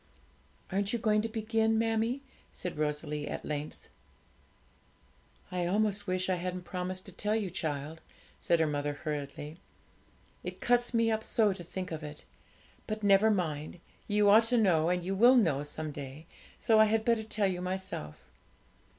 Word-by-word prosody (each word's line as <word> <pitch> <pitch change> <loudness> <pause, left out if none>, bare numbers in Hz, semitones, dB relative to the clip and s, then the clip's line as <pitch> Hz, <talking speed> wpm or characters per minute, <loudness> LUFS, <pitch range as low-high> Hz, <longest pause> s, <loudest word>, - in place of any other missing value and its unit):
'Aren't 200 +2 0
you - - +2
going 215 -2 +2
to 225 - -3
begin, 225 0 +1
mammie?' 225 +4 0 0.3
said 180 - -5
Rosalie 150 0 -2
at - - -5
length. 150 0 -5 1.6
'I 180 -1 -1
almost 205 +1 +1
wish 185 0 0
I 185 -1 +1
hadn't 180 +1 -4
promised 185 +1 -4
to - - -8
tell 210 +1 -1
you, 205 -5 -1
child,' 155 -2 -4 0.4
said 170 - +2
her 160 - +4
mother 145 -1 -1
hurriedly; 150 +1 -5 0.8
'it - - -6
cuts 245 0 +2
me 230 0 +3
up 220 0 -1
so 215 -3 +2
to 185 -2 -9
think 185 +2 -6
of 160 -1 -4
it; 150 0 -8 0.6
but 215 0 -4
never 200 +2 +5
mind, 165 -5 -2 0.3
you 205 0 +3
ought 220 +3 +7
to 245 +1 +2
know, 170 -7 +3
and 180 0 0
you 190 +2 -2
will 240 +6 +6
know 165 - +3
some 150 +1 -4
day, 145 +1 -8 0.3
so 225 -2 +4
I 220 - +8
had 220 0 +1
better 230 -2 +3
tell 215 -1 -1
you 180 -2 -1
myself. 180 - -5
185 Hz, 165 wpm, -31 LUFS, 155-220 Hz, 1.6 s, I